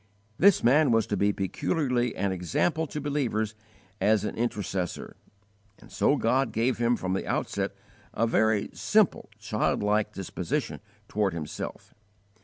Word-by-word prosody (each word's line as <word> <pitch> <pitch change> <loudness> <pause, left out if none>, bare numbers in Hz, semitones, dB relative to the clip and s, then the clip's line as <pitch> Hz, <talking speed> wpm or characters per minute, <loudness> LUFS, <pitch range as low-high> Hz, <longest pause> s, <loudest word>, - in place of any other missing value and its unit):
This 200 0 +5
man 140 +5 +5
was 115 -2 +3
to 105 - -2
be 100 +1 +2
peculiarly 120 - -1
an 100 +1 0
example 95 - 0
to 150 - -5
believers 130 -7 -1 0.5
as 105 +1 +3
an - - -3
intercessor; 100 -6 -3 0.6
and - - -17
so 145 - +2
God 130 0 +1
gave 115 +4 0
him 120 0 +3
from 95 -4 -3
the 95 - -2
outset - - -2 0.4
a 115 - +1
very 110 -2 +2
simple, - - +2
childlike 105 +1 0
disposition 105 - -3 0.3
toward 100 -3 0
Himself. 75 -3 -6
110 Hz, 135 wpm, -27 LUFS, 100-130 Hz, 0.6 s, This